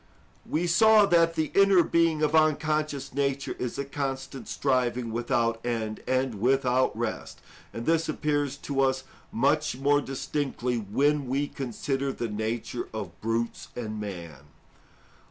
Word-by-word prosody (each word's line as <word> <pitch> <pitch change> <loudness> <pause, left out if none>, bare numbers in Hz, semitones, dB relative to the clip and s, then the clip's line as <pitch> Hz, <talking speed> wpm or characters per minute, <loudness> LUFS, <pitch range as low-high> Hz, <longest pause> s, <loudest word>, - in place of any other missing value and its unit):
We 165 +3 0
saw 215 +5 +6
that 165 -2 +3
the 155 -2 -1
inner 195 -3 +6
being 165 -2 +2
of 150 0 +2
unconscious 155 -3 +1
nature 140 0 -1
is 125 - -3
a 140 - -2
constant 135 -2 -4
striving 125 -3 0
without 115 0 0
end 110 -3 -3
and 130 -5 0
without 130 -2 +2
rest. 115 -1 -4 0.3
And 115 - -6
this 165 0 +2
appears 145 -2 -1
to 140 -1 -2
us 130 0 +1 0.3
much 145 +3 +1
more 145 +2 +3
distinctly 135 -2 -2
when 140 +7 +1
we 140 +3 0
consider 135 +1 -3
the 120 -3 -4
nature 110 +3 -3
of 95 -5 -7
brutes 115 +1 -2
and 110 -3 -4
man. 85 -8 -7
135 Hz, 135 wpm, -27 LUFS, 115-150 Hz, 0.3 s, saw